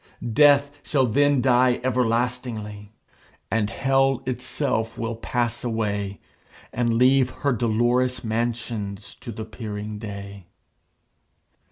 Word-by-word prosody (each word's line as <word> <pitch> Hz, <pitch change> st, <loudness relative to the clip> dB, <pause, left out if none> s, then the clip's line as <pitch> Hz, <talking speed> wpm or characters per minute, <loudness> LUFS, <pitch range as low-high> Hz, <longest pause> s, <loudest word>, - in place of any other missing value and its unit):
Death 145 Hz, +1 st, +5 dB
shall 135 Hz, -3 st, +1 dB
then 140 Hz, +3 st, +3 dB
die 125 Hz, -1 st, +4 dB
everlastingly, 115 Hz, -4 st, -1 dB, 0.6 s
And 110 Hz, -2 st, +1 dB
Hell 135 Hz, 0 st, +1 dB
itself 125 Hz, -2 st, -2 dB
will 115 Hz, 0 st, -3 dB
pass 120 Hz, 0 st, -2 dB
away, 100 Hz, -4 st, -2 dB, 0.5 s
And 120 Hz, -1 st, +1 dB
leave 130 Hz, +2 st, +4 dB, 0.2 s
her 140 Hz, -, +4 dB
dolorous 120 Hz, +2 st, +1 dB
mansions 110 Hz, -3 st, -3 dB
to 115 Hz, -, -8 dB
the 110 Hz, 0 st, -6 dB
peering 105 Hz, -2 st, -6 dB
day. 100 Hz, -3 st, -8 dB
120 Hz, 100 wpm, -24 LUFS, 110-130 Hz, 0.6 s, Death